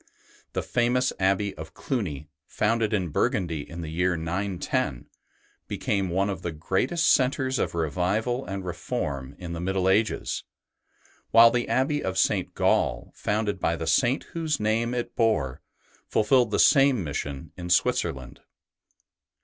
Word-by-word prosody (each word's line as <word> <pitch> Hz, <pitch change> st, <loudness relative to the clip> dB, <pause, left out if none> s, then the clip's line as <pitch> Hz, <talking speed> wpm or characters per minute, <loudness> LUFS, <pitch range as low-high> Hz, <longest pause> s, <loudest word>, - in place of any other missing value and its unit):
The -, -, -2 dB
famous 125 Hz, +2 st, +1 dB
Abbey 100 Hz, +1 st, +1 dB
of 80 Hz, +2 st, -9 dB
Cluny, 80 Hz, -, -3 dB, 0.2 s
founded 110 Hz, 0 st, 0 dB
in 95 Hz, -5 st, 0 dB
Burgundy 80 Hz, 0 st, -1 dB
in 85 Hz, +1 st, -7 dB
the 80 Hz, -, -5 dB
year 90 Hz, +1 st, +1 dB
910, 85 Hz, -6 st, -2 dB, 0.6 s
became 95 Hz, -2 st, -1 dB
one 95 Hz, +3 st, +1 dB
of 95 Hz, -4 st, -4 dB
the 85 Hz, -, -3 dB
greatest 95 Hz, -, 0 dB
centres 130 Hz, -1 st, +2 dB
of -, -, -1 dB
revival 95 Hz, -, 0 dB
and 95 Hz, -4 st, -5 dB
reform 80 Hz, -, -4 dB
in 85 Hz, -2 st, -6 dB
the 85 Hz, -, -4 dB
Middle 95 Hz, +1 st, 0 dB
Ages, 105 Hz, +3 st, +1 dB, 0.9 s
while 115 Hz, 0 st, +8 dB
the 120 Hz, 0 st, -1 dB
Abbey 145 Hz, +3 st, +1 dB
of 95 Hz, 0 st, -2 dB
St. -, -, +1 dB
Gall, -, -, +1 dB
founded 105 Hz, -2 st, -1 dB
by 85 Hz, -, +1 dB
the 80 Hz, -, -4 dB
Saint 130 Hz, -, +2 dB
whose 160 Hz, -3 st, -1 dB
name 115 Hz, +3 st, 0 dB
it 120 Hz, -, -4 dB
bore, 105 Hz, -, +1 dB, 0.5 s
fulfilled 120 Hz, +2 st, +3 dB
the 105 Hz, -, 0 dB
same 135 Hz, -, +5 dB
mission 70 Hz, 0 st, -5 dB
in 90 Hz, -1 st, -7 dB
Switzerland. 90 Hz, +2 st, 0 dB
95 Hz, 140 wpm, -26 LUFS, 85-120 Hz, 0.9 s, while